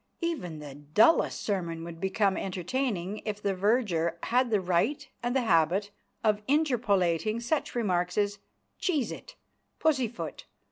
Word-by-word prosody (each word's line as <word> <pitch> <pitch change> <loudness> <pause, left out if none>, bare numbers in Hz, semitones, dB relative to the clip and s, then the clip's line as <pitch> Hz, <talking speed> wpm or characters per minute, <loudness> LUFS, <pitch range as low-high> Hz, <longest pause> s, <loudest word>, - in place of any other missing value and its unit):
Even 300 - -2
the 145 -2 -8
dullest 150 - +3
sermon 170 -5 -2
would 165 -1 -8
become 195 0 +2
entertaining 195 +1 -2
if 210 -1 -3
the 200 -1 0
verger 185 -5 +1
had 250 +1 +2
the 215 -2 +3
right 185 +10 0
and 245 +1 -1
the 265 - +3
habit 185 +1 +2 0.3
of 210 -1 +2
interpolating 220 - +2
such 265 +5 -1
remarks 180 -6 0
as: 205 -1 +1 0.4
"Cheese 295 - 0
it, - - -9 0.4
Pussyfoot!" 260 -7 -1
205 Hz, 135 wpm, -29 LUFS, 175-240 Hz, 0.4 s, dullest